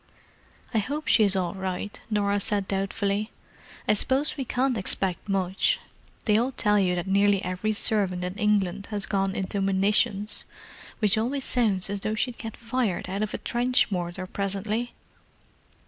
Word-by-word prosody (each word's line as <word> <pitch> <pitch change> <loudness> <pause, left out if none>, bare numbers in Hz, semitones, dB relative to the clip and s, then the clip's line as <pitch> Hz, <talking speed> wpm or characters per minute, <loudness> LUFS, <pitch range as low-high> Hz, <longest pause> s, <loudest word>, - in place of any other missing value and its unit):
"I 225 - +3
hope 290 +8 -3
she's 205 -4 +5
all 180 -2 0
right," 190 +1 -4
Norah 205 -1 +1
said 200 -1 0
doubtfully. 200 +2 -1 0.6
"I - - +5
suppose 265 +7 +1
we 270 -3 -3
can't 255 +1 +1
expect 190 -2 -2
much—they 195 - -1
all 255 +3 0
tell 210 -3 +3
you 180 -2 +2
that 175 - -2
nearly 200 0 +3
every 185 +4 -1
servant 195 -4 +1
in 180 - -3
England 205 -2 +1
has 210 -2 0
'gone 195 -1 0
into 195 +1 -2
munitions,' 200 +2 +2 0.5
which 215 0 +3
always 265 +5 -1
sounds 210 -7 +2
as 200 0 -3
though 215 +2 -1
she'd 240 +2 -2
get 225 -2 -6
fired 230 -6 -1
out 195 +2 -2
of 215 -1 -1
a - - -2
trench 245 -1 +1
mortar 180 0 -3
presently." 200 +5 -2
205 Hz, 155 wpm, -26 LUFS, 195-225 Hz, 0.6 s, she's